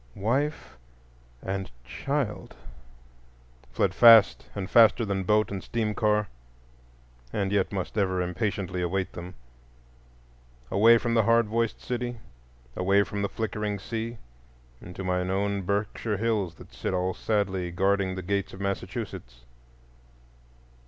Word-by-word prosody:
Wife 130 - -2 0.6
and 95 0 -3 0.2
child?"—fled - - -5
fast 115 -3 +7
and 100 -2 -3
faster 115 +2 +5
than 95 -2 -2
boat 105 +2 +2
and 95 -2 -4
steam 110 -3 -2
car, 105 -1 +1 1.0
and 100 -2 -1
yet 100 -2 +1
must 95 -1 -4
ever 95 -3 +1
impatiently 90 0 -2
await 95 +2 -2
them; 90 +1 -8 1.4
away 115 +4 +6
from 115 0 -1
the 115 - +4
hard 115 +1 +4
voiced 115 +1 -1
city, 120 0 -4 0.6
away 100 +2 +3
from 100 0 -5
the 100 - -1
flickering 105 -1 -3
sea 115 +3 -5 0.6
into 90 +1 -8
my 90 0 0
own 100 +2 -1
Berkshire 100 +2 -2
Hills 105 -5 -1
that - - -15
sit 95 - -3
all 90 +1 0
sadly 95 -4 -1
guarding 95 +1 +1
the 95 - -5
gates 100 +2 -2
of 95 - -10
Massachusetts. 80 -10 -5
100 Hz, 125 wpm, -27 LUFS, 90-110 Hz, 1.4 s, fast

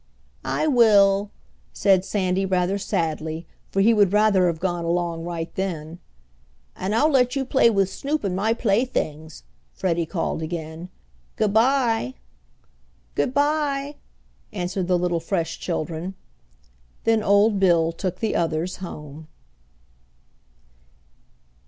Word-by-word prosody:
"I - - -1
will," 205 -7 +4 0.4
said 190 -2 +3
Sandy 190 -1 0
rather 190 +1 0
sadly, 160 -2 -2 0.2
for 195 - 0
he 225 +4 +5
would 205 -4 +4
rather 205 -3 +4
have 165 -2 -2
gone 175 -1 -2
along 170 -1 -1
right 170 -1 -5
then. 170 -3 -4 0.8
"And 200 +3 -2
I'll 300 +7 +3
let 250 -1 +3
you 270 -1 -1
play 260 -2 +4
with 195 -4 +2
Snoop 285 +9 -3
and 190 -3 -1
my 215 +4 +1
playthings," 195 - -1 0.3
Freddie 170 -2 -1
called 165 -2 -2
again. 160 +1 -6 0.5
"Good 210 -2 0
bye." 230 - +2 1.0
"Good 145 - 0
bye," 290 -1 0 0.5
answered 180 -1 -3
the 180 -1 +3
little 175 -1 0
fresh 165 -1 -3
children. 170 +2 -4 0.9
Then 225 -1 +2
old 205 0 +3
Bill 170 -4 +3
took 180 +2 -5
the 220 - 0
others 165 +1 -1
home. 155 -4 -9
190 Hz, 120 wpm, -23 LUFS, 170-215 Hz, 1.0 s, he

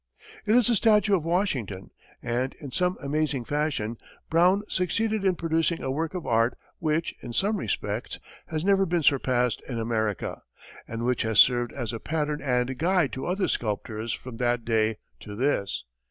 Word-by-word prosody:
It 215 - +4
is 245 -3 +5
a 240 - +3
statue 210 -1 +4
of 170 - -1
Washington, 140 - -1 0.3
and, 125 +3 -1
in 140 -3 -9
some 180 +5 +1
amazing 145 -3 -1
fashion, 140 -7 -1 0.3
Brown 180 +5 +4
succeeded 215 +3 0
in 190 -2 +3
producing 165 0 0
a 130 - -1
work 160 +5 -2
of 180 - -4
art, 115 +1 +2 0.2
which, 160 +1 0
in 120 - -7
some 205 - +2
respects, 105 - -3 0.3
has 160 0 -3
never 195 -1 +4
been 170 -1 0
surpassed 125 -3 +2
in 120 - -3
America, 110 -3 -2 0.5
and 115 +1 -4
which 125 -1 +1
has 110 -1 -1
served 120 -2 +6
as 120 -4 -4
a 115 - -4
pattern 150 0 -2
and 125 -1 0
guide 175 -2 +2
to 130 - -4
other 185 +2 0
sculptors 110 +1 -2
from 125 0 -6
that 120 -1 0
day 110 -1 +1 0.2
to 105 - -8
this. 100 - 0
140 Hz, 170 wpm, -26 LUFS, 115-175 Hz, 0.5 s, served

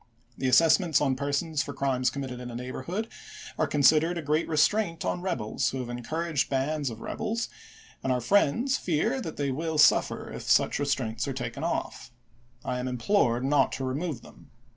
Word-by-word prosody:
The 130 - -2
assessments 165 +4 +5
on 135 -3 +1
persons 145 +3 -1
for 145 - -6
crimes 130 -2 +1
committed 130 -3 -5
in 125 0 -7
a 120 - -7
neighborhood 130 - -4 0.5
are - - +1
considered 155 +4 +4
a 165 - -4
great 155 +3 0
re 155 - -1
straint 165 0 +2
on 175 - -1
rebels 135 - -1
who 135 - -4
have 125 -2 -5
encouraged 150 +5 -2
bands 140 +1 0
of 115 -1 -9
rebels, 225 +2 -3 0.5
and 130 - -1
our 125 - +1
friends 205 - +2
fear 215 - 0
that 160 -7 -6
they 140 -1 -1
wiU 160 +3 -2
suffer - - +3
if - - -6
such - - +2
restraints 125 -4 -1
are 135 - -2
taken 125 +2 -5
off. 165 -5 -3 0.5
I 125 - -2
am 125 - -3
implored 125 - +1
not 140 -1 +3
to 135 - -4
remove 140 0 -3
them. - - -16
145 Hz, 185 wpm, -27 LUFS, 130-165 Hz, 0.5 s, assessments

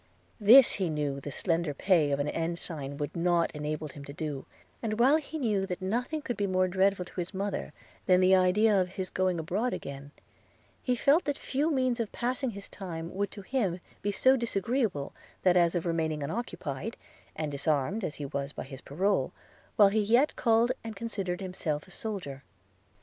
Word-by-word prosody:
This 235 +5 +8
he 185 -4 0
knew 145 -3 -2
the 140 - -6
slender 165 0 -1
pay 170 -3 +3
of 140 0 0
an 145 - 0
ensign 165 -4 -3
would 145 -1 -4
not 170 0 +2
enable 150 0 -4
him 145 -1 -10
to 140 - -8
do; 150 -3 -5 0.3
and, 215 -1 -2
while 270 +6 +6
he 315 0 -6
knew 210 -8 0
that 180 0 -4
nothing 245 +11 -2
could 245 -6 -2
be 205 - 0
more 185 -1 +2
dreadful 190 0 +2
to 180 - -8
his 180 +3 -6
mother 200 +1 -3 0.4
than 180 -1 +6
the 185 0 +5
idea 195 +2 +4
of 180 - -2
his 185 0 -5
going 185 -1 +1
abroad 195 +10 -1
again, 140 0 -6 0.7
he 250 - +1
felt 285 +8 +3
that 290 -2 -1
few 285 +4 -1
means 255 -5 +1
of 225 -3 -2
passing 255 +2 -1
his 200 -2 -7
time 170 -3 -6
would 200 +1 -1
to 200 - -10
him 195 -7 -1 0.2
be 205 - 0
so 260 +6 +4
disagreeable 230 - -1 0.3
as 175 -2 +5
that - - +1
of 170 - -3
remaining 160 -3 -1
unoccupied, 175 - -4 0.4
and 155 -2 -3
disarmed 150 +7 0
as 150 - -3
he 145 - -5
was 140 +1 -4
by - - -5
his 135 0 -10
parole, 195 +8 0 0.4
while 205 -4 +7
he 215 +2 +1
yet 235 +8 +3
called 230 0 +3
and 225 -1 -6
considered 195 -4 -3
himself 170 -5 -3
a - - -16
soldier. 175 -10 -5
185 Hz, 190 wpm, -29 LUFS, 155-225 Hz, 0.7 s, This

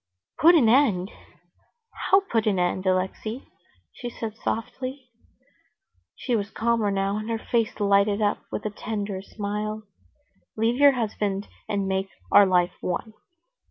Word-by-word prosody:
"Put 340 +3 +7
an 270 -9 +5
end? 220 -7 +3 1.0
How 390 +1 +6
put 225 - -1
an 200 -3 +2
end, 180 +1 0
Alexey?" 190 +6 -1 0.5
she 245 - -6
said 225 -2 -6
softly. 255 +4 -5 1.0
She 245 - -1
was 200 -2 -2
calmer 230 -1 0
now, 195 +1 0
and 215 +1 -5
her 225 - 0
face 225 0 -1
lighted 200 0 +3
up 205 -1 +1
with 210 - -4
a 215 - -1
tender 205 -2 -4
smile. 210 +1 -4 0.7
"Leave 225 +3 +1
your 285 0 +7
husband 205 -4 -2 0.2
and 200 -2 -1
make 190 0 -1 0.2
our 205 -1 +7
life 180 -1 +2
one." 200 +5 -3
215 Hz, 140 wpm, -25 LUFS, 200-230 Hz, 1.0 s, Put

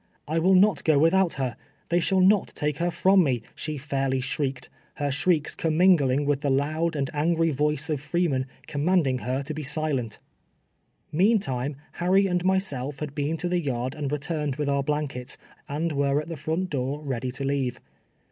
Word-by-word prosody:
''I 160 +2 0
will 190 +3 +5
not 190 -3 +4
go 155 -2 +4
without 170 +4 +3
her. 130 -4 -2 0.3
They 175 +1 +3
shall 190 +2 +2
noti^Q 185 -7 +2
lier 175 - +2
from 190 +2 +4
me," 125 -6 0
she 155 -1 -4
fairly 135 -1 -1
shrieked, 135 0 -2 0.3
her 145 -1 -1
shrieks 150 +2 +1
com 160 -1 -1
mingling 145 -7 +4
with 140 -1 +1
the 145 - 0
loud 155 +5 0
and 140 -2 0
angry 165 +2 +1
voice 150 +1 0
of 150 -4 -2
Freeman, 150 -4 0 0.2
commanding 150 -3 +1
her 130 +3 -2
to 155 - -5
bo 155 - -5
silent. 140 -6 -2 0.9
Meantime 150 - +1 0.2
Harry 190 +3 +2
and 180 -2 0
myself 165 -8 0
had 150 -1 -5
been 145 +2 -1
to 175 - -2
the 175 0 0
yard 130 -3 -2
and 145 -3 -4
returned 150 -1 -2
with 145 0 -2
our 140 0 +2
blankets, 140 -3 -3 0.3
and 160 +4 -1
were 140 0 +1
at 155 - -6
the 165 - -4
front 160 +5 -2
door 135 +1 -2
ready 130 -3 -3
to 135 - -5
leave. 135 -3 -1
150 Hz, 180 wpm, -26 LUFS, 135-170 Hz, 0.9 s, will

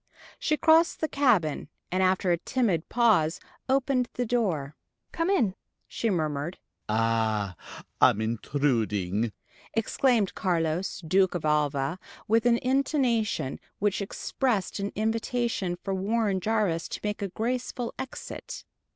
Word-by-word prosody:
She 305 - +1
crossed 325 +2 +4
the 315 - 0
cabin, 220 - +2 0.2
and 185 +1 +1
after 185 0 +2
a 170 - +2
timid 195 -8 0
pause 215 -10 +3 0.3
opened 260 -2 +2
the 245 - -1
door. 180 - -1 0.4
"Come 330 +2 -1
in," 235 - +2 0.3
she 230 - -1
murmured. 155 -2 -1 0.3
"Ah, 110 -3 +1 0.5
I'm 105 - +6
intruding," 110 -3 0 0.4
exclaimed 225 -2 +2
Carlos, 175 +1 -1
Duke 190 +1 +3
of 170 - -3
Alva, 150 +1 +1 0.3
with 225 +2 +3
an 235 -1 +5
intonation 250 - +1 0.2
which 205 0 0
expressed 210 0 -1
an 200 0 -2
invitation 225 -3 -1
for 195 - -2
Warren 200 +1 0
Jarvis 205 -5 0
to - - -5
make 210 0 -2
a 200 - -1
graceful 240 +4 -3
exit. 265 - -7
195 Hz, 125 wpm, -27 LUFS, 155-235 Hz, 0.5 s, I'm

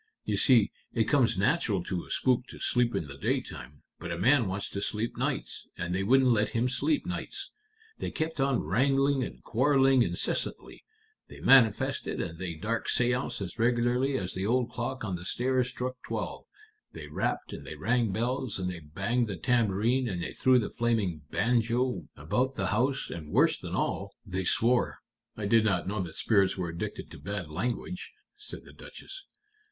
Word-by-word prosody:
You - - 0
see, 120 -7 +5 0.2
it 115 - +4
comes 125 -5 +2
natural 105 - +1
to 90 -1 -4
a - - -17
spook 125 -1 +1
to - - -10
sleep 120 -1 +1
in - - -1
the 70 -1 -10
daytime, 70 +1 -3 0.2
but 85 - -5
a 85 - -2
man 120 +5 +4
wants 95 +2 -3
to 100 - -3
sleep 110 +3 -1
nights, - - -3
and 85 +1 -3
they 95 - 0
wouldn't 130 +5 +4
let 105 -2 +2
him 120 +2 +2
sleep 290 - 0
nights. - - -5 0.5
They - - -2
kept 155 -2 -2
on 135 -2 +2
wrangling 135 - +2
and - - -7
quarreling 135 +1 +4
incessantly; - - -2 0.4
they - - -12
manifested 125 -6 +4
and 80 0 -4
they 90 -3 -4
dark 105 +8 -2
séanced 125 -2 0
as 95 +5 -7
regularly 120 +3 +2
as 95 -4 -3
the 95 - -3
old 120 +3 +1
clock 130 +1 -4
on 95 -4 -2
the 85 - -8
stairs 125 +5 +1
struck 125 0 -4
twelve; - - -4 0.5
they - - -7
rapped - - -2
and - - -7
they - - -7
rang 120 -4 +1
bells 120 +3 -1
and 90 -1 -2
they 90 - -6
banged 100 +11 -1
the 100 -3 -4
tambourine 120 +5 +2
and 90 -3 -3
they - - -5
threw 130 -1 +4
the 115 - -1
flaming 110 -9 0
banjo 120 +3 +1
about 125 - -1
the 95 -2 -1
house, 130 +5 0
and, 75 -3 -7
worse - - +4
than - - -5
all, 100 0 -2
they 95 -2 -3
swore." 120 +6 +2 0.4
"I 105 - -3
did 115 +2 +4
not 95 -5 +1
know 100 +1 -1
that 85 -3 -6
spirits 100 -4 +3
were 90 -2 -2
addicted 85 +1 -5
to - - -10
bad 95 -6 -5
language," 120 - -3 0.2
said 420 0 -9
the - - -14
Duchess. 385 0 -11
115 Hz, 185 wpm, -29 LUFS, 95-125 Hz, 0.5 s, see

